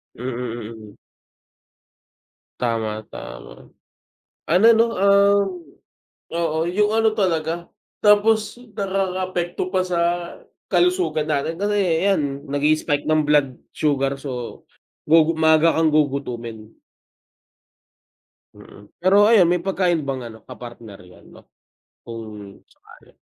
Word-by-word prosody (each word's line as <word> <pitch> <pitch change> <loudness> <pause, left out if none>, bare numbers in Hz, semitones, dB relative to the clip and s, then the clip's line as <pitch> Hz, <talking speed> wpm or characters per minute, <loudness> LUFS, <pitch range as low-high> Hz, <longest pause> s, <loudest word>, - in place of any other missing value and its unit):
Mm, - - -12 0.5
mm. 110 -2 -14 1.6
Tama, 110 -3 -2
tama. - - -10 0.8
Ano 180 +7 +4
'no, 230 0 +4
um, 200 +1 +4 0.8
oo 165 -2 -2
'yung 210 +4 +1
ano 220 -1 +2
talaga, 170 -4 -1 0.4
tapos 215 +2 +3 0.2
nakaka-apekto 185 -2 -2
pa 185 - +2
sa 180 -2 -1 0.7
kalusugan 360 - +1
natin, 155 +2 -2
kasi 195 -3 0
ayan 145 -8 0
nag 145 -1 -3
i-spike 150 0 +1
ng 155 -1 +2
blood 145 -4 +2 0.2
sugar 140 -2 -1
so, 125 -4 -6 0.5
gugu 160 +1 +5
maaga 160 +1 +5
kang 160 0 +2
gugutumin. 125 -7 -2 1.9
Mm, 100 +1 -15
pero 200 +3 +5
ayan, 210 -7 +6
may 180 - +1
pagkain 180 -2 0
bang 135 -2 -3
ano 110 - -14
ka - - -9
partner 115 -4 -11
'yan 90 0 -18
'no, - - -16 0.6
kung 105 -3 -9
sakali. - - -21
160 Hz, 110 wpm, -21 LUFS, 135-195 Hz, 1.9 s, ayan